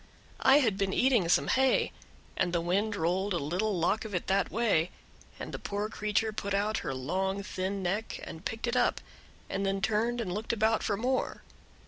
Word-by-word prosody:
I 265 +1 +7
had 215 -6 +1
been 195 -1 0
eating 245 -9 +3
some - - +4
hay, 265 0 +3 0.4
and 185 -2 +1
the 170 - +2
wind 200 +5 0
rolled 185 +2 0
a - - +2
little 180 +7 -1
lock 180 +6 +1
of 215 -4 -5
it 175 - -1
that 195 +1 +1
way, 200 -8 +2 0.5
and - - -6
the - - -4
poor 205 +1 -3
creature 215 0 0
put 200 -1 -2
out 210 +2 +1
her 135 -5 -4
long 190 +9 -1
thin 190 0 -3
neck 205 +5 -2
and 160 - -8
picked 225 +3 -3
it 240 +1 -1
up, - - +2 0.5
and 195 - -2
then 195 0 0
turned 225 +4 +1
and 190 -6 -2
looked 215 +4 -2
about 220 0 +2
for 205 - 0
more. 255 +4 -1
200 Hz, 195 wpm, -30 LUFS, 185-220 Hz, 0.5 s, I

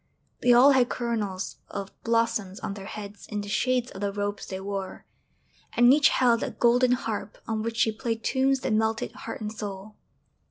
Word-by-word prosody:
They 245 - +4
all 250 +4 +8
had 255 -2 +4
coronals 215 -5 -3
of 200 -1 -5
blossoms 230 -4 0
on - - -3
their 195 -1 -8
heads 205 -1 -8
in 210 -1 -3
the 205 - -7
shades 250 +3 +1
of 195 - -9
the 200 -1 0
robes 205 0 -3
they 190 - -5
wore; 195 -1 -5 0.7
and 240 +2 +6
each 290 -1 +5
held 240 -3 +3
a - - -1
golden 245 +1 +3
harp 225 -4 -3
on 220 -1 -1
which 230 +1 -3
she 220 - +3
played 225 0 -3
tunes 265 0 +2
that - - -1
melted 220 +1 0
heart 225 - -8
and 210 0 -3
soul. 205 -1 -7
220 Hz, 190 wpm, -26 LUFS, 205-240 Hz, 0.7 s, all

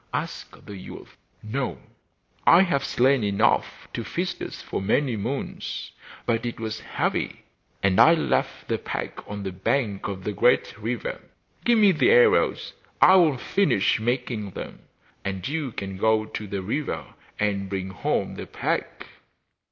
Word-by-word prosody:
asked - - -5
the 100 - -8
youth. 95 - -11 0.3
'No; 120 - -2 0.7
I 170 +3 +8
have 140 -7 0
slain 130 -1 +3
enough 100 -1 +1
to - - -3
feast - - -3
us - - -6
for - - -4
many 120 +5 +1
moons, 125 +7 -4 0.3
but 115 -1 +1
it 120 -1 -4
was 110 -1 -4
heavy, - - -2 0.4
and 95 -1 +3
I 165 - +8
left 160 - -1
the - - -1
pack - - -4
on 105 -1 -5
the 95 - -3
bank 100 +2 -1
of 95 -1 -5
the 105 - -2
great 125 +5 +3
river. 115 +1 -3 0.4
Give 240 -1 +5
me 210 -2 +6
the 175 - +3
arrows, 470 -1 +4 0.3
I 190 - +8
will 160 -7 +4
finish 125 - +2
making 120 -2 -2
them, - - -7 0.4
and 95 -2 -3
you 150 -3 -2
can 95 -2 -6
go 110 +1 +2
to 105 -1 -6
the 100 -1 -4
river 140 +9 -2 0.3
and 100 -2 -1
bring 95 -1 -3
home - - -1
the - - -7
pack! - - -3
110 Hz, 155 wpm, -25 LUFS, 100-140 Hz, 0.7 s, I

